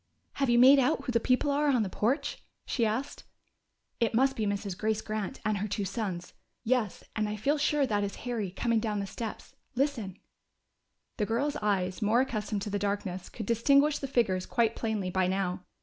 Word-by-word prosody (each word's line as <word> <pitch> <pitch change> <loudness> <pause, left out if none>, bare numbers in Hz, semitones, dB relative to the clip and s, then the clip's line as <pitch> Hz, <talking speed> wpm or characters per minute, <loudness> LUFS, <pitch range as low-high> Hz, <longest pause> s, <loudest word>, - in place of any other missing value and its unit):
"Have 275 -2 0
you 240 - +4
made 265 +3 +8
out 255 - +2
who - - -2
the 235 - +3
people 255 +4 +2
are 295 +1 +2
on 250 -5 +3
the - - -2
porch?" 265 +10 -1 0.2
she 235 -4 +1
asked. 240 +7 -3 0.8
"It 230 -1 +1
must 265 +3 +3
be 215 -2 -1
Mrs. 200 -2 -2
Grace 215 +2 0
Grant 215 -2 -4
and 215 -2 +1
her 210 - -2
two 205 0 -2
sons. 190 -4 -4 0.3
Yes, 240 -4 0
and 215 -1 0
I 210 - -2
feel 280 +8 0
sure 295 -1 +2
that 205 -4 0
is 200 - -3
Harry, 230 -6 -2
coming 230 +5 0
down 215 -2 -1
the 200 - -2
steps 220 +2 -6 0.2
now.... 265 - +4
Listen!" 225 -10 -4 1.0
The 210 - 0
girls' 280 +6 0
eyes, 195 -2 -1
more 220 +3 +3
accustomed 210 -5 -2
to 210 - -4
the 205 - -1
darkness, 200 -2 -3
could 220 - -6
distinguish 280 +7 +3
the 275 - -4
figures 205 -8 +1
quite 230 -2 +1
plainly 215 -5 -2
by 185 0 +2
now. 185 -1 -2
220 Hz, 200 wpm, -29 LUFS, 200-250 Hz, 1.0 s, made